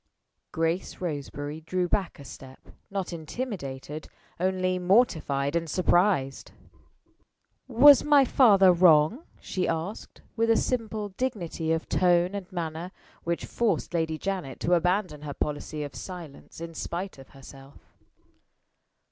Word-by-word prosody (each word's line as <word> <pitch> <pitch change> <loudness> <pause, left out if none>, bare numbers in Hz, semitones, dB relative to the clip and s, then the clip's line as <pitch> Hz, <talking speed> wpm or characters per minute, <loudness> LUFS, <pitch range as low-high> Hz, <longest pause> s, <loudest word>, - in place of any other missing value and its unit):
Grace 165 +3 -2
Roseberry 145 -2 -5
drew 180 +2 -1
back 190 0 -1
a 140 - -12
step 130 -1 -11 0.3
not 195 -3 -4
intimidated 155 - -6 0.3
only 185 0 0
mortified 170 - +2
and 165 -1 -1
surprised. 175 -5 +1 1.1
"Was 270 +3 +7
my 290 -2 +5
father 200 -8 +6
wrong?" 175 - +4 0.2
she 185 - -2
asked, 165 +6 -5
with 230 0 +1
a 225 - +5
simple 220 -4 -2
dignity 185 -8 -3
of 160 0 -1
tone 180 0 +2
and 200 -1 -6
manner 170 0 -4 0.3
which 170 0 -2
forced 235 -6 -1
Lady 160 -2 -1
Janet 180 -8 -4
to 180 - +1
abandon 180 -2 +1
her 145 -2 -6
policy 150 +1 -3
of 145 - -7
silence, 175 -7 -9
in 165 0 -7
spite 175 0 -5
of 135 - -14
herself. 135 0 -15
175 Hz, 125 wpm, -27 LUFS, 155-195 Hz, 1.1 s, Was